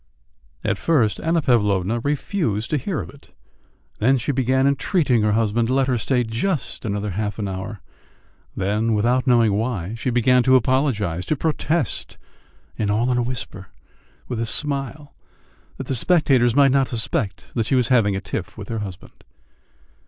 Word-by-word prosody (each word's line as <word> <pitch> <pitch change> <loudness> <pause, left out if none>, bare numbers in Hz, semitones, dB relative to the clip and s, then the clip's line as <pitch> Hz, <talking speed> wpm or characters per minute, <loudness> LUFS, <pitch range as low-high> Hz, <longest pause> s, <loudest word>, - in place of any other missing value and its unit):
At - - -1
first 125 -11 +2
Anna 165 -1 0
Pavlovna 105 -3 +2
refused 140 - -2
to 155 - +2
hear 155 +5 -3
of - - -9
it, 140 - -19 0.7
then 130 +5 +3
she 130 +4 -1
began 130 0 +1
entreating 140 - +2
her 105 0 +2
husband 115 +1 +1
to 130 - 0
let 135 -1 +3
her 125 -3 +1
stay 125 +2 +1
just 120 +8 -3
another 105 -1 -2
half 105 +2 -3
hour; 95 +1 -5 0.8
then, 105 +4 0
without 125 +5 +1
knowing 115 -4 +4
why, 105 -3 -2
she 115 +2 -3
began 125 +1 +3
to 130 +1 +4
apologise, 115 - +1
to 155 - +1
protest 155 - -2 0.6
and 105 -2 0
all 115 +5 +1
in 125 - +1
a - - +2
whisper, 120 -6 -5 0.6
with 120 -3 -4
a 115 - -1
smile, 140 +2 -2 0.6
that - - -6
the - - -2
spectators 130 -4 +3
might 140 -1 +5
not 135 -1 +3
suspect 110 -4 -3
that 115 -3 -1
she 135 - +2
was 125 -2 +2
having 110 -6 +3
a 95 - -3
tiff - - -5
with - - -8
her 115 -1 -2
husband. 95 -4 -9
120 Hz, 165 wpm, -22 LUFS, 105-135 Hz, 0.8 s, might